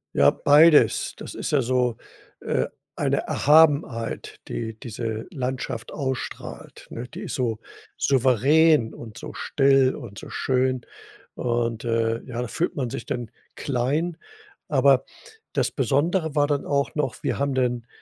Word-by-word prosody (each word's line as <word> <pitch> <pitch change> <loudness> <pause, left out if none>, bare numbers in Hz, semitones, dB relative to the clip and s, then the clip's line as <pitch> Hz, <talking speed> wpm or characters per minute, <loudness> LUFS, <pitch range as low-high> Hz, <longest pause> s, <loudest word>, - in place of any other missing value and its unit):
Ja, 70 - +6
beides. 150 - +5
Das - - -9
ist - - -4
ja 145 - +3
so, 125 -1 +1 0.5
äh, 65 - 0 0.3
eine - - +1
Erhabenheit, 145 -6 +2
die 110 -1 -4
diese 110 -1 -5
Landschaft 130 - -4
ausstrahlt, 130 -3 -5
ne? 120 +2 -6
Die - - -9
ist - - -5
so 115 -4 -1 0.4
souverän 135 +1 +3
und 115 -1 -10
so - - -8
still 135 -2 +3
und 110 -8 -9
so - - -10
schön 130 -1 0 0.5
und, 120 -1 -1
äh, 115 0 0
ja, 120 -1 -4
da 125 - -3
fühlt 175 - -2
man 130 -4 -2
sich 115 - -6
dann 120 -3 -4 0.2
klein, 145 +6 -1 0.5
aber - - +4 0.5
das - - +1
Besondere 160 +2 0
war 145 -1 +3
dann 145 -1 -1
auch 140 -1 0
noch, 140 -5 -2
wir - - -1
haben 140 0 0
denn, 125 -2 -1
130 Hz, 145 wpm, -24 LUFS, 115-145 Hz, 0.5 s, Ja